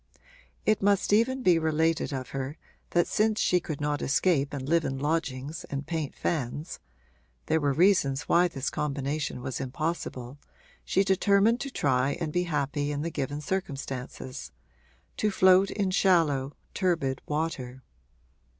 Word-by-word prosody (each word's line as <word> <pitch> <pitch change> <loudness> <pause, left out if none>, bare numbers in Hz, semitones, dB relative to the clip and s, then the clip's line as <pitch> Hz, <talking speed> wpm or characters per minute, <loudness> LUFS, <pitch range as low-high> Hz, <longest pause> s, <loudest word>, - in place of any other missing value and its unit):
It 215 -1 +2
must 200 0 +2
even 255 +5 +2
be 175 -5 +5
related 160 0 +1
of 130 -2 -4
her 135 +2 -4 0.3
that 175 0 +3
since 215 0 +1
she 180 - +3
could 155 -4 -5
not 150 0 -1
escape 140 -1 +2
and 135 -2 -5
live 165 +1 +3
in 135 - -2
lodgings 145 0 -2
and 140 0 -5
paint 160 -3 -3
fans 150 +1 -3 0.7
(there 160 - +2
were 145 -1 +2
reasons 145 -4 +3
why 175 +1 +4
this 140 -5 -3
combination 140 -2 -2
was 130 - -4
impossible) 135 -2 -4 0.4
she 195 - +2
determined 200 +4 +3
to 275 - -4
try 135 - +1
and 160 -3 -3
be 180 0 +1
happy 145 -2 -1
in 145 0 -2
the 170 - -3
given 145 0 -3
circumstances 135 - -5 0.7
to 215 - +1
float 190 0 +5
in 195 -3 -1
shallow, 155 -8 +2 0.2
turbid 165 -8 0
water. 140 -5 -3
150 Hz, 145 wpm, -28 LUFS, 135-180 Hz, 0.7 s, be